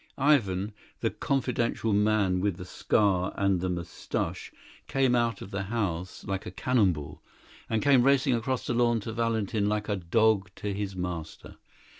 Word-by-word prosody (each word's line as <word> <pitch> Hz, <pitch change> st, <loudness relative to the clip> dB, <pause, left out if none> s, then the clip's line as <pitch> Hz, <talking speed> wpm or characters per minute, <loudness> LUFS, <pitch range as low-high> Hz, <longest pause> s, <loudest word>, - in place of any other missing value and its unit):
Ivan, 105 Hz, -9 st, +2 dB, 0.3 s
the -, -, +1 dB
confidential 120 Hz, -4 st, -1 dB
man 105 Hz, -3 st, +2 dB
with 95 Hz, -2 st, 0 dB
the 90 Hz, -, -7 dB
scar 95 Hz, 0 st, +1 dB
and 100 Hz, -3 st, +2 dB
the 95 Hz, -, -1 dB
moustaches, 85 Hz, -2 st, -4 dB, 0.4 s
came 135 Hz, -2 st, +2 dB
out 120 Hz, -3 st, +1 dB
of 95 Hz, -, -11 dB
the 100 Hz, -, -2 dB
house 95 Hz, -5 st, -3 dB
like 95 Hz, -1 st, -4 dB
a -, -, -3 dB
cannon 105 Hz, +1 st, +2 dB
ball, 75 Hz, -4 st, -8 dB, 0.5 s
and 110 Hz, -1 st, 0 dB
came 140 Hz, -3 st, +5 dB
racing 135 Hz, 0 st, +3 dB
across 125 Hz, +2 st, -1 dB
the -, -, -1 dB
lawn 120 Hz, -1 st, +2 dB
to 110 Hz, +2 st, -5 dB
Valentin 110 Hz, -3 st, 0 dB
like 105 Hz, 0 st, -2 dB
a 105 Hz, -, +1 dB
dog 100 Hz, +2 st, +2 dB
to 105 Hz, -1 st, -4 dB
his 100 Hz, -1 st, -4 dB
master. 90 Hz, -3 st, -6 dB
105 Hz, 165 wpm, -28 LUFS, 95-120 Hz, 0.5 s, came